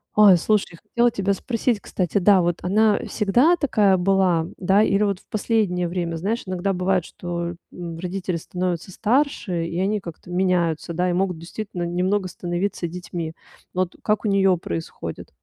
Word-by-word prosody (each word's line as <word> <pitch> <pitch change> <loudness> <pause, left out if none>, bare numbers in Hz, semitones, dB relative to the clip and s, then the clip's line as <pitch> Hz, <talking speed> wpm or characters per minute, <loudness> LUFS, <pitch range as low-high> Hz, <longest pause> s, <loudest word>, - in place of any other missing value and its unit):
Ой, 205 -4 +8
слушай, 205 0 0
хотела 240 0 +2
тебя 200 -2 0
спросить, 230 +2 -1
кстати, 185 -2 -2
да, 195 0 +5
вот 175 0 0
она 210 +3 +3
всегда 240 - +3
такая 215 - +3
была, 180 -3 +2
да, 195 +3 +3
или 205 0 +2
вот 200 -3 0
в - - -27
последнее 205 -5 0
время, 170 -1 -2
знаешь, 205 +8 -2
иногда 185 +1 -1
бывает, 185 -1 +1
что, 175 -1 -4 0.2
м, 170 -2 -7
родители 185 0 -3
становятся 180 +1 -3
старше, 215 - 0
и 170 +1 -3
они 205 +3 +1
как-то 170 -1 -10
меняются, 175 -3 0
да, 180 +2 0
и - - 0
могут 180 -1 0
действительно 175 +2 -6
немного 185 +3 0
становиться 175 0 -3
детьми. 170 -2 -5 0.4
Вот 185 -1 -1
как 210 0 0
у - - +2
неё 195 -2 +3
происходит? 85 - -6
185 Hz, 165 wpm, -23 LUFS, 175-205 Hz, 0.4 s, Ой